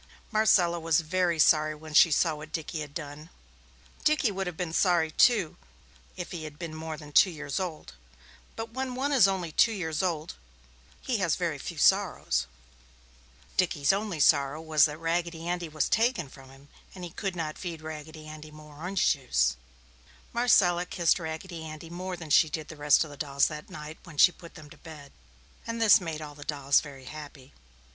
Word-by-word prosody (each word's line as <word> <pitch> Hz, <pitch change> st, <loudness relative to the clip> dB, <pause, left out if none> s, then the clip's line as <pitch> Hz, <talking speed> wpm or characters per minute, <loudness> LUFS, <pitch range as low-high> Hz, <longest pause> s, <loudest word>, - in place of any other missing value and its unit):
Marcella 185 Hz, -6 st, +3 dB
was 165 Hz, 0 st, +2 dB
very 175 Hz, +1 st, 0 dB
sorry 155 Hz, 0 st, +4 dB
when 155 Hz, 0 st, -11 dB
she 165 Hz, -, +7 dB
saw 160 Hz, +1 st, +2 dB
what 155 Hz, +1 st, -9 dB
Dickie 160 Hz, 0 st, -4 dB
had 150 Hz, -1 st, -7 dB
done. 150 Hz, -1 st, -7 dB, 0.7 s
Dickie 290 Hz, -7 st, +2 dB
would 195 Hz, -1 st, -3 dB
have 175 Hz, -2 st, -6 dB
been 175 Hz, -3 st, -4 dB
sorry, 170 Hz, -3 st, +2 dB
too, 200 Hz, -3 st, +3 dB, 0.6 s
if 180 Hz, -, -6 dB
he 170 Hz, -4 st, -6 dB
had 150 Hz, -1 st, -9 dB
been 165 Hz, 0 st, -6 dB
more 160 Hz, 0 st, -6 dB
than 150 Hz, -1 st, -11 dB
two 185 Hz, -, +6 dB
years 150 Hz, -3 st, -4 dB
old, 165 Hz, -, -5 dB, 0.6 s
but 225 Hz, 0 st, -6 dB
when 260 Hz, 0 st, -3 dB
one 275 Hz, +3 st, -1 dB
is 255 Hz, -8 st, +6 dB
only 185 Hz, -4 st, -2 dB
two 230 Hz, -, +4 dB
years 160 Hz, -6 st, -2 dB
old, 165 Hz, -4 st, -2 dB, 0.7 s
he -, -, -1 dB
has -, -, +1 dB
very -, -, -2 dB
few -, -, -7 dB
sorrows. -, -, +2 dB, 1.1 s
Dickie's 165 Hz, -4 st, +2 dB
only 200 Hz, -4 st, -3 dB
sorrow 140 Hz, 0 st, +3 dB
was 155 Hz, -2 st, +4 dB
that 150 Hz, -1 st, -4 dB
Raggedy 165 Hz, 0 st, -2 dB
Andy 175 Hz, -1 st, -2 dB
was 155 Hz, 0 st, -1 dB
taken 225 Hz, -, +1 dB
from 135 Hz, 0 st, -15 dB
him, 135 Hz, +2 st, -17 dB, 0.3 s
and 185 Hz, -, -9 dB
he 175 Hz, -, -6 dB
could 195 Hz, +1 st, -4 dB
not 155 Hz, -3 st, -4 dB
feed 165 Hz, -4 st, -6 dB
Raggedy 155 Hz, 0 st, -8 dB
Andy 155 Hz, 0 st, -10 dB
more 150 Hz, -1 st, -14 dB
orange 180 Hz, +4 st, +1 dB
juice. 65 Hz, -, 0 dB, 0.8 s
Marcella 180 Hz, -7 st, +3 dB
kissed 170 Hz, -2 st, +2 dB
Raggedy 160 Hz, +1 st, -6 dB
Andy 160 Hz, +1 st, -9 dB
more 180 Hz, +1 st, -5 dB
than 160 Hz, -3 st, -9 dB
she 160 Hz, -, +5 dB
did 155 Hz, 0 st, -5 dB
the 160 Hz, -, -8 dB
rest 145 Hz, 0 st, +4 dB
of 155 Hz, -, -10 dB
the 145 Hz, -, -11 dB
dolls 140 Hz, -1 st, +1 dB
that 150 Hz, -1 st, -8 dB
night, 150 Hz, +1 st, -9 dB
when 165 Hz, -5 st, -13 dB
she 175 Hz, -, +7 dB
put 170 Hz, -1 st, -14 dB
them 155 Hz, -3 st, -12 dB
to -, -, -14 dB
bed, 150 Hz, -4 st, -12 dB, 0.6 s
and 230 Hz, 0 st, -3 dB
this 220 Hz, -3 st, +6 dB
made 160 Hz, -3 st, -5 dB
all 150 Hz, -1 st, -9 dB
the 145 Hz, 0 st, -11 dB
dolls 140 Hz, -2 st, +2 dB
very 135 Hz, -3 st, -11 dB
happy. 145 Hz, -2 st, -10 dB
160 Hz, 190 wpm, -28 LUFS, 150-180 Hz, 1.1 s, she